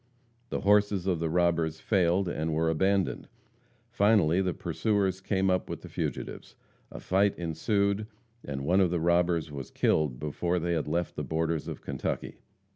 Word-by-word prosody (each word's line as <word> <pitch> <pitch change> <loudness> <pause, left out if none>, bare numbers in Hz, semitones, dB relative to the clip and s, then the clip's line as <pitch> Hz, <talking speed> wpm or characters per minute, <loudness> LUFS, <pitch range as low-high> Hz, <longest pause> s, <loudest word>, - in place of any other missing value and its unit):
The - - -2
horses 100 -2 +3
of 90 -4 0
the 80 -1 -1
robbers 85 -2 +1
failed 95 -1 +2
and 80 -2 -2
were 80 +1 +2
abandoned. 95 +4 0 0.6
Finally 100 -6 +3
the 95 -1 0
pursuers 95 +2 -1
came 95 -1 +1
up 90 - 0
with - - -5
the - - -9
fugitives. - - -5 0.3
A - - -9
fight 100 +2 +1
ensued, 100 +5 0 0.4
and 70 -1 -5
one 95 +5 +4
of 90 - +3
the 85 0 0
robbers 85 -1 +1
was 70 -3 -7
killed 75 -6 +1
before 85 +4 -1
they 85 0 -1
had 80 -3 -1
left 85 +3 -1
the - - -3
borders 80 0 -1
of - - -6
Kentucky. 70 -2 -4
85 Hz, 165 wpm, -28 LUFS, 80-95 Hz, 0.6 s, one